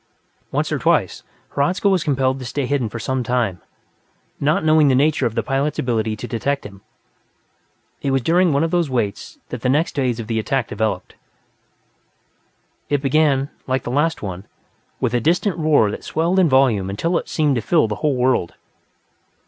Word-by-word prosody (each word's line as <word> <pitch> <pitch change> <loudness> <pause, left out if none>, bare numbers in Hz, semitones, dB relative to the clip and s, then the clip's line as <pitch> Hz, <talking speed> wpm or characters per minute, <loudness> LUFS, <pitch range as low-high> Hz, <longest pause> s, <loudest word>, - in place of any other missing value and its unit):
Once - - -1
or - - 0
twice, - - +1 0.3
Hradzka 175 +8 0
was 190 -4 +2
compelled 135 -2 0
to 130 - -7
stay 135 +3 -2
hidden 130 -4 -1
for 115 - -6
some 130 +3 -2
time, 115 -7 -1 0.8
not 155 +2 +1
knowing 155 -1 +5
the 130 - +4
nature 140 -1 +2
of 115 - -6
the - - 0
pilot's 135 +2 -1
ability 110 -3 -1
to 105 - -7
detect 140 +5 -2
him. 100 -1 -11 1.2
It 140 - -1
was 135 -2 +1
during 175 +4 +3
one 140 +2 +2
of 165 - -1
these 175 -4 +1
waits 115 -6 -3
that - - -6
the 125 - 0
next 150 +6 +1
phase 125 -4 0
of 115 - -4
the 110 0 -1
attack 125 +1 -1
developed. 105 -3 -3 1.8
It 145 -1 0
began, 140 -1 +2 0.2
like 130 0 0
the 120 - -4
last 150 +3 0
one, 95 -1 -6 0.5
with 115 - -1
a 120 - +1
distant 175 - +1
roar 150 -9 +3
that - - -7
swelled 170 +4 0
in 180 -4 +4
volume 125 -8 +3
until 165 - 0
it - - -10
seemed 150 -3 +1
to - - -1
fill 160 -4 +2
the 105 -1 -4
whole 150 -3 +1
world. 125 -9 +1
135 Hz, 185 wpm, -20 LUFS, 115-155 Hz, 1.8 s, knowing